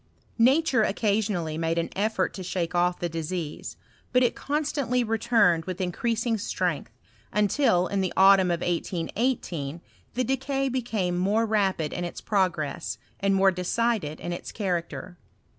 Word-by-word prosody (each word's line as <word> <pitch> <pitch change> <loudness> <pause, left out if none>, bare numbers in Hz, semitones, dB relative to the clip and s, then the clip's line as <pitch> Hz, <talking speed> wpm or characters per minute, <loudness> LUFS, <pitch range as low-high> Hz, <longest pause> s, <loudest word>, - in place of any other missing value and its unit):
Nature 265 +1 +4
occasionally 200 -7 0
made 165 0 0
an 170 - -1
effort 205 -2 0
to 195 - -7
shake 180 -2 -2
off 175 0 +2
the 175 - -2
disease; 165 -1 -5 0.3
but 250 0 +4
it 245 - +2
constantly 280 -4 0
returned 220 -7 +2
with 185 0 -5
in 180 -1 -1
creasing 230 +2 -1
strength, 205 - -2 0.4
until, 210 -3 +3
in 195 +1 -1
the 185 - -1
autumn 190 -1 +6
of 170 -1 0
1818, 175 - -2 0.4
the 255 - +1
decay 270 +1 -1
became 225 -8 -1
more 205 +5 +2
rapid 195 -8 0
in 175 - -3
its 175 - -5
progress, 180 -8 -1 0.2
and 195 0 +2
more^ 195 0 +4
decided 180 -2 -1
in 175 - -4
its 175 - -6
character. 180 -2 -3
195 Hz, 145 wpm, -26 LUFS, 175-230 Hz, 0.4 s, autumn